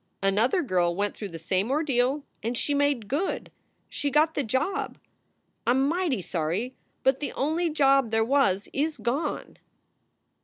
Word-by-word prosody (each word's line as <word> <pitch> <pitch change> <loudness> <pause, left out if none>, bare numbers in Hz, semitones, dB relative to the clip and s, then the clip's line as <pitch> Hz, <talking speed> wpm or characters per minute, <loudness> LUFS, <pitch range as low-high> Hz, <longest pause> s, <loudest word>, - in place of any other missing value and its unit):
Another 225 - +2
girl 175 - +1
went 205 +1 -1
through 205 - -6
the 165 - -7
same 185 +6 -1
ordeal 275 -1 +1 0.2
and 230 +3 -2
she 290 - 0
made 285 -6 +1
good. 295 - -2 0.4
She 290 - -2
got 305 +3 +3
the 290 - 0
job. 380 - -1 0.7
I - - +4
m 265 +2 +2
mighty 325 - 0
sorry, 180 +10 -2 0.3
but 265 0 +3
the 290 - -3
only 320 +5 0
job 275 -5 +3
there 225 0 +2
was 230 -7 +2
is 300 +3 0
gone." 260 +7 -2
265 Hz, 155 wpm, -27 LUFS, 210-295 Hz, 0.7 s, I